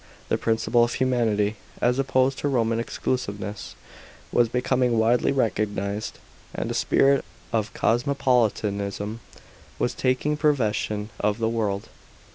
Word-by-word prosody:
The - - +2
principle 115 +1 +2
of 120 - 0
humanity, 110 -5 +1 0.2
as 125 +2 +2
opposed 130 0 +2
to - - -1
Eoman 115 -4 +1
exclusiveness, 105 -4 -3 0.6
was 120 -1 +3
becoming 125 0 +1
widely 115 +4 +3
recognised; 105 -4 -1 0.4
and - - -2
a - - -1
spirit 140 0 +3 0.3
cf 110 -2 0
cosmopolitanism 110 -5 0 0.6
was 125 - 0
taking 130 +4 0
possession 110 -7 0
of 105 0 +1
the 115 -1 0
world. 105 -3 -2
115 Hz, 115 wpm, -25 LUFS, 105-130 Hz, 0.6 s, was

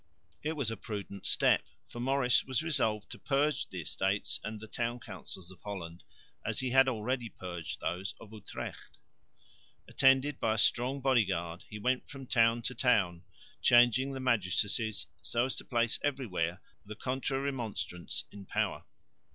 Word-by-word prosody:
It 155 +2 -1
was 140 -8 -1
a 115 - -4
prudent 100 -2 -5
step, - - +4 0.2
for 120 - -9
Maurice 130 0 +3
was 130 +2 0
resolved 110 -10 +1
to - - -8
purge 145 +2 +1
the 95 -2 -5
Estates 95 +5 0
and 110 0 -5
the 110 - -8
town 120 +2 -2
councils 95 -4 -9
of 90 - -16
Holland, 90 -5 -6 0.4
as - - -1
he 130 -1 -1
had 135 +1 +6
already 120 0 -1
purged 90 -4 -6
those 95 +3 -3
of 110 -1 -12
Utrecht. 105 -2 -8 0.9
Attended 135 +1 +4
by 110 -1 +2
a - - -3
strong 125 +5 +3
body 130 -3 +4
guard 85 -2 -3
he 105 - -6
went 125 +4 0
from 135 -2 -8
town 115 -1 +3
to 125 - -2
town, 95 -10 +2 0.4
changing 120 +3 +5
the 135 - -4
magistracies, 110 -4 +1 0.2
so 115 +11 +1
as 130 - -1
to - - -5
place 120 -1 +1
everywhere 90 - -1 0.2
the 105 +1 -8
Contra 130 +3 -1
Remonstrants 115 -10 -3
in 100 -1 -11
power. - - -1
115 Hz, 160 wpm, -32 LUFS, 100-130 Hz, 0.9 s, had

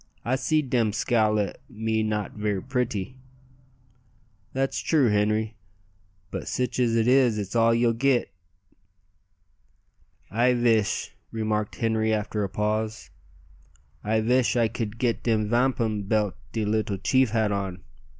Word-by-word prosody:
I 125 +2 +1
seed 145 +1 0
dem 115 -4 +2
scowl 110 -1 +2
at 100 -3 -3
me 110 -1 -1
not 105 -1 -2
ver' 105 -2 -2
pritty." 125 -1 -3 1.3
"That's 135 +1 -1
true, 145 -7 +2
Henri; 105 +1 0 0.7
but - - -5
sich 125 -1 -2
as 120 -2 +2
it 115 0 +2
is 125 -3 +4
it's 100 +1 -4
all 115 0 +4
ye'll 115 0 +3
git." 130 +1 +1 2.0
"I 120 +3 +3
vish," 115 -5 +1 0.2
remarked 110 -1 -2
Henri 110 -1 0
after 105 0 -1
a 100 - -2
pause 110 +2 -2 0.9
"I 110 +1 +1
vish 125 +3 +2
I 120 -2 +3
could 110 0 -5
git 115 -1 0
de 115 -2 +2
vampum 110 -2 0
belt 105 -2 +1 0.2
de 110 -2 -1
leetle 105 -1 0
chief 130 +5 +2
had 110 -1 +1
on. 95 -3 -3
110 Hz, 135 wpm, -26 LUFS, 105-120 Hz, 2.0 s, is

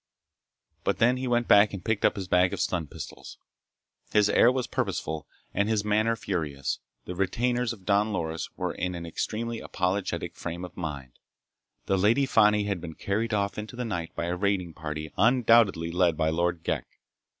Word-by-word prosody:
But - - +1
then 125 +2 +3
he 130 0 -3
went 120 -1 +1
back 100 +1 +6
and 90 - -9
picked 110 -2 +1
up - - +3
his 95 -2 -5
bag 90 0 +3
of - - -3
stun 85 -4 -1
pistols. - - -9 0.7
His 105 -1 +4
air 120 - +6
was 130 -1 -1
purposeful 95 - -3 0.3
and 100 +1 +1
his 105 -2 +1
manner 110 +2 +2
furious. 80 -10 -3 0.3
The 90 - -5
retainers 120 +6 0
of 100 -6 -10
Don 105 +2 +2
Loris 80 -4 -3
were - - -2
in 90 0 -3
an 85 -1 -6
extremely 115 +7 -3
apologetic 95 +1 -2
frame 85 +1 -5
of 90 +1 -12
mind. 70 -7 -6 0.7
The 95 - +1
Lady 115 +8 +4
Fani 105 -4 +4
had 100 -4 -2
been 80 -2 -7
carried 110 +4 -1
off 100 0 0
into 110 +3 -7
the 125 0 -3
night 90 -7 -4
by 85 - -2
a 85 +1 -1
raiding 90 -3 0
party 75 0 -5
undoubtedly 115 -7 +4
led 85 -2 +2
by 80 0 +2
Lord 85 0 0
Ghek. - - -3
100 Hz, 185 wpm, -27 LUFS, 85-110 Hz, 0.7 s, back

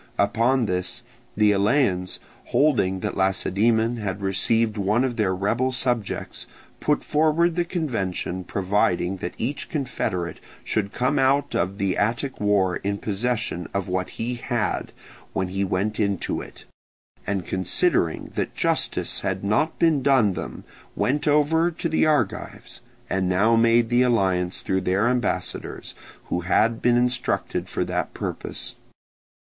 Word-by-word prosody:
Upon 115 +5 +2
this 90 +4 -2 0.3
the 105 -1 +5
Eleans, 100 -3 +1 0.3
holding 100 -11 +2
that - - -3
Lacedaemon 110 +5 +2
had 100 -3 -3
received 110 +3 +1
one 105 +4 +1
of 130 -2 -1
their 100 -5 +1
rebel 115 +7 0
subjects, 125 -4 -2 0.3
put 150 - +1
forward 160 +2 +2
the 175 -1 +1
convention 110 - -2
providing 95 -1 0
that 90 - -5
each 135 +6 -3
confederate 90 - -2 0.2
should 100 -2 -1
come 130 +4 0
out 140 +1 +2
of 95 +2 -1
the 95 -2 0
Attic 120 +6 -1
war 100 -3 +2
in 100 +1 -2
possession 110 -3 -2
of 100 -1 -1
what 90 0 -1
he 120 +2 -2
had 120 -2 -2 0.4
when 95 -1 -1
he 95 +1 -1
went 100 +3 -1
into 100 -3 -1
it, - - -12 0.6
and 95 -2 -1
considering 95 - +1
that - - -3
justice - - 0
had 95 -1 -2
not 105 +11 +1
been 160 -4 +3
done 130 -7 +4
them 90 - -6 0.3
went 145 +4 0
over 150 +3 +3
to 170 0 -3
the 160 -1 +2
Argives, 150 -2 -1 0.3
and 95 -1 0
now 105 +5 +3
made 115 0 +4
the 120 +1 +3
alliance 95 -7 +1
through 95 0 0
their 95 +5 +1
ambassadors, 125 0 -2 0.3
who - - -1
had 110 +6 +2
been 120 0 +4
instructed 125 0 -1
for - - -1
that - - -3
purpose. - - -5
110 Hz, 140 wpm, -24 LUFS, 95-125 Hz, 0.6 s, the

